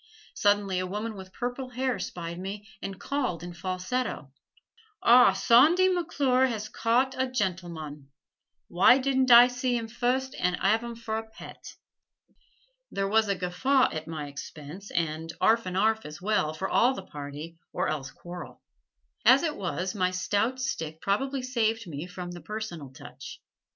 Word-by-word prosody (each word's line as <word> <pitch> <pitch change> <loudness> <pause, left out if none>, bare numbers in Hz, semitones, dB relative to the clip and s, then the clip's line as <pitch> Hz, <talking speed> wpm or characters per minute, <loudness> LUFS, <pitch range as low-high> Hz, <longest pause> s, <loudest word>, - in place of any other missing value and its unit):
Suddenly 205 -2 +2
a 185 - -2
woman 210 +3 -4
with 190 -1 -10
purple 245 +4 -4
hair 255 0 -1
spied 170 0 -5
me 200 +3 -6
and 195 -1 -6
called 250 - -2
in 175 0 -7
falsetto: 185 - -3 0.7
"Ah, 245 +1 +7
Sawndy 340 +10 +5
McClure 275 -7 +2
has 215 -3 -4
caught 245 +4 +1
a 260 - +1
gen'l'mon. 170 - -4 0.6
Why 185 +8 +6
didn't 265 -1 +1
I 240 0 +10
see 245 0 -1
'im 230 -1 -4
fust 250 +3 -1
an' 180 0 +1
'arve 220 +5 +2
'im 235 -1 -6
fer 225 -1 -4
a 220 0 -6
pet?" - - -11 1.1
There 195 0 -1
was 220 +1 +3
a 200 - +1
guffaw 250 +10 +2
at 155 0 -5
my 155 -2 -5
expense 150 +6 -9
and 165 0 -2
'arf 225 -2 +3
and 185 0 -3
'arf 220 +2 +2
as 150 0 -9
well, 180 -6 0
for 190 +4 -3
all 255 +3 +3
the 195 - -7
party, 150 +1 -8
or - - -1
else 135 -3 -3
quarrel. 175 +3 -10 0.6
As 255 +6 +6
it 310 -3 -1
was, 185 0 -3
my 185 -3 +1
stout 205 +7 0
stick 160 - -3
probably 265 +8 -1
saved 230 -3 0
me 160 0 -6
from 180 -1 -7
the 175 -1 -9
"personal 210 -10 -6
touch." 130 - -11
205 Hz, 160 wpm, -28 LUFS, 175-245 Hz, 1.1 s, I